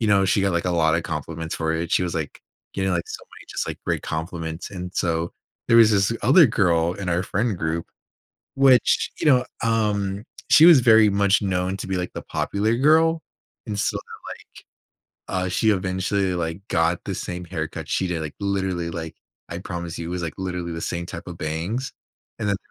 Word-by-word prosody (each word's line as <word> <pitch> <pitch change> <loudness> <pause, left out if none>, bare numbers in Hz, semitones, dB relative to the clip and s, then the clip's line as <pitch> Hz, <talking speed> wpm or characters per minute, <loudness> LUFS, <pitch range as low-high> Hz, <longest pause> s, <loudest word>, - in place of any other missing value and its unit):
you 110 - +1
know, 100 -1 +4
she 95 +1 +2
got, 95 -1 +1
like, 85 0 0
a 90 - 0
lotta 85 -1 +2
compliments 80 +1 -5
for 80 -1 -1
it. 80 +1 -3
She - - +3
was, 90 -2 -2
like 80 -3 -4 0.3
you 95 - -1
know, 95 - +1
like, 85 - 0
so - - -7
many - - -13
just, - - -3
like, - - -4
great - - -1
compliments, 80 +1 -5
and 90 -1 -7
so 85 -1 -1 0.3
there 115 - +5
was 115 -2 +7
this 100 +1 +2
other 150 +6 +7
girl 85 -7 +2
in 95 -1 -5
our 90 +1 +1
friend 105 0 -1
group, 80 +1 -2 0.7
which, 135 -2 +4
you - - -1
know, 130 -4 +5 0.2
um, 105 -3 0 0.3
she 155 - +7
was 170 -4 +9
very 110 -2 +6
much 100 0 +2
known 95 -1 -1
to 95 - -7
be, 95 - -1
like, 90 0 -3
the - - -5
popular 110 +3 -1
girl. 160 +4 +4 0.5
And 105 -2 -3
so, - - 0 1.3
like, 95 -1 -1
uh, - - -2
she 110 +4 +2
eventually, 95 0 0
like, 80 +1 -3
got 85 +1 +1
the - - -3
same 90 0 -5
haircut 80 -3 -5
she 95 - 0
did, 85 -2 -2
like, 75 -2 -6
literally, 95 -4 -1
like, 80 -1 -6 0.3
I 85 - -5
promise 85 -2 -6
you, 85 - -5
it - - -5
was, 90 0 -3
like, 85 - -4
literally 90 -2 -4
the 85 - -5
same 85 +1 -3
type - - -8
of 90 -2 -7
bangs. 90 - -3 0.5
And 105 -2 -2
then, 100 - +1
90 Hz, 205 wpm, -23 LUFS, 85-105 Hz, 1.3 s, was